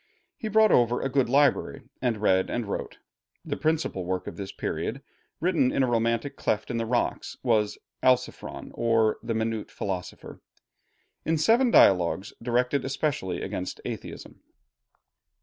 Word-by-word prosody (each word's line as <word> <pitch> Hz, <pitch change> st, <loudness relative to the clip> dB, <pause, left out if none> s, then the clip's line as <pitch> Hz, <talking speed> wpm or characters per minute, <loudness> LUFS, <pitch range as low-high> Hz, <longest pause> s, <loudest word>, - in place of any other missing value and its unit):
He 230 Hz, -, -5 dB
brought 215 Hz, +1 st, +4 dB
over 120 Hz, 0 st, +4 dB
a 135 Hz, -, -2 dB
good 130 Hz, -3 st, +1 dB
library, 140 Hz, 0 st, +2 dB, 0.2 s
and 120 Hz, -3 st, 0 dB
read 95 Hz, -2 st, +3 dB
and 120 Hz, -, -2 dB
wrote. 100 Hz, -, -5 dB, 0.5 s
The -, -, -2 dB
principal 155 Hz, -, -1 dB
work 90 Hz, +1 st, -2 dB
of -, -, -7 dB
this 100 Hz, -2 st, -6 dB
period, -, -, -4 dB, 0.4 s
written 160 Hz, -7 st, +2 dB
in 135 Hz, -, +2 dB
a -, -, +2 dB
romantic 115 Hz, +4 st, 0 dB
cleft 105 Hz, -, -1 dB
in 120 Hz, -, -2 dB
the 115 Hz, -1 st, -2 dB
rocks, 120 Hz, 0 st, -1 dB
was 110 Hz, -4 st, +1 dB, 0.2 s
'Alciphron, 130 Hz, -1 st, 0 dB
or 115 Hz, -2 st, +2 dB
the 115 Hz, 0 st, -3 dB
Minute 110 Hz, -1 st, -2 dB
Philosopher,' 95 Hz, -3 st, -6 dB, 0.8 s
in 160 Hz, 0 st, +1 dB
seven 235 Hz, -, +4 dB
dialogues, 95 Hz, -, +4 dB
directed 125 Hz, +3 st, +1 dB
especially 135 Hz, -, -2 dB
against 90 Hz, -, -4 dB
atheism. -, -, -7 dB
120 Hz, 145 wpm, -27 LUFS, 105-140 Hz, 0.8 s, brought